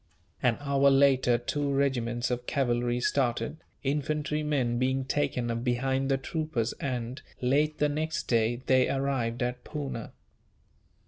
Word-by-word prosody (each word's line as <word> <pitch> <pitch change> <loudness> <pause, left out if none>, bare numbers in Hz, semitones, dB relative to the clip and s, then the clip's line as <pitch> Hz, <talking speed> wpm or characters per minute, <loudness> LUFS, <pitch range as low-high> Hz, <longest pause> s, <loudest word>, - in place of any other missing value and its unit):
An 120 -3 +2
hour 140 -1 +3
later 135 -3 +4
two 140 +4 -2
regiments 125 -3 0
of 125 0 -3
cavalry 120 -3 +1
started, 130 +3 0 0.3
infantry 150 +2 -1
men 130 -6 0
being 130 +1 +1
taken 125 -4 0
up 115 0 -3
behind 130 +2 0
the 135 - +3
troopers 135 -4 -2
and, 125 0 -3 0.2
late 150 +5 +2
the 150 - +3
next 155 +2 -2
day, 120 +1 +1
they 130 -1 +4
arrived 130 -4 -1
at 125 0 -3
Poona. 140 -7 -5
130 Hz, 135 wpm, -29 LUFS, 120-140 Hz, 0.3 s, later